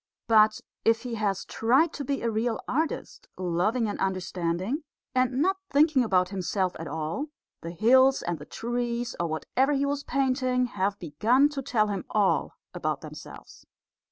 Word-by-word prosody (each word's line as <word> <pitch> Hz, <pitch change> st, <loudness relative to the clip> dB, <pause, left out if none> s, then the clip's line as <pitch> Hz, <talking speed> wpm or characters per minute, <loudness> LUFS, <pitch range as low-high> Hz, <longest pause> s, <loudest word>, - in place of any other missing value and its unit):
But 215 Hz, -1 st, +5 dB, 0.2 s
if 225 Hz, 0 st, +2 dB
he 245 Hz, -2 st, -5 dB
has 205 Hz, -4 st, -1 dB
tried 265 Hz, +9 st, +2 dB
to 285 Hz, -, -5 dB
be 275 Hz, -1 st, -2 dB
a 230 Hz, -, +1 dB
real 225 Hz, +1 st, -1 dB
artist, 315 Hz, +5 st, -3 dB
loving 185 Hz, +7 st, 0 dB
and 205 Hz, -, -4 dB
understanding, 185 Hz, -, -2 dB, 0.3 s
and 255 Hz, +2 st, +2 dB
not 380 Hz, +2 st, +1 dB
thinking 290 Hz, -2 st, +4 dB
about 185 Hz, -5 st, +2 dB
himself 190 Hz, -1 st, -1 dB
at 165 Hz, -, -5 dB
all, 160 Hz, -, -3 dB, 0.3 s
the 165 Hz, -, -6 dB
hills 260 Hz, +9 st, +4 dB
and 170 Hz, -2 st, -3 dB
the 150 Hz, -, -11 dB
trees, 240 Hz, 0 st, -3 dB
or 170 Hz, -, 0 dB
whatever 255 Hz, -, 0 dB
he 280 Hz, 0 st, +1 dB
was 285 Hz, 0 st, -2 dB
painting, 255 Hz, -2 st, +1 dB
have 200 Hz, -3 st, -1 dB
begun 225 Hz, -, +2 dB
to 290 Hz, -2 st, -4 dB
tell 215 Hz, -5 st, +1 dB
him 200 Hz, -2 st, -3 dB
all 205 Hz, -2 st, +1 dB, 0.2 s
about -, -, -2 dB
themselves. -, -, -11 dB
230 Hz, 160 wpm, -27 LUFS, 190-260 Hz, 0.3 s, But